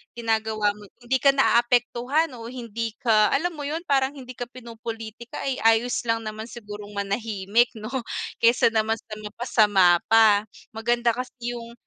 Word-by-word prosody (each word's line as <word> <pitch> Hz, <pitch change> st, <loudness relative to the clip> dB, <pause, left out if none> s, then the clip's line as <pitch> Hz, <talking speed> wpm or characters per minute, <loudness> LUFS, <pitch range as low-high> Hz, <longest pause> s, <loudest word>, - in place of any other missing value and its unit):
ginagawa 220 Hz, -2 st, 0 dB
mo 205 Hz, 0 st, -13 dB, 0.2 s
hindi 255 Hz, +2 st, +1 dB
ka 275 Hz, 0 st, +4 dB
naapektuhan 245 Hz, +4 st, +2 dB
o 230 Hz, -, -8 dB
hindi 230 Hz, -2 st, -5 dB
ka, 215 Hz, -3 st, +4 dB
alam 345 Hz, +6 st, 0 dB
mo 295 Hz, -4 st, -6 dB
yun 320 Hz, +3 st, -3 dB
parang 275 Hz, -4 st, +1 dB
hindi 255 Hz, -2 st, -9 dB
ka 245 Hz, -, -4 dB
pinopolitika 230 Hz, -1 st, -9 dB
ay 270 Hz, -2 st, -2 dB
ayos 225 Hz, +2 st, +3 dB
lang 230 Hz, 0 st, 0 dB
naman 215 Hz, +1 st, -6 dB
sigurong 210 Hz, -3 st, -9 dB
manahimik 200 Hz, +2 st, +1 dB
no? 215 Hz, 0 st, -7 dB, 0.5 s
Kaysa 235 Hz, 0 st, +4 dB
naman 220 Hz, 0 st, +1 dB
sa 215 Hz, -1 st, -10 dB
mapasama 210 Hz, -5 st, +3 dB
pa, 215 Hz, -2 st, +5 dB, 0.3 s
maganda 235 Hz, +2 st, +1 dB
kasi 245 Hz, 0 st, -5 dB
yung 235 Hz, -1 st, -8 dB
230 Hz, 150 wpm, -24 LUFS, 215-245 Hz, 0.5 s, pa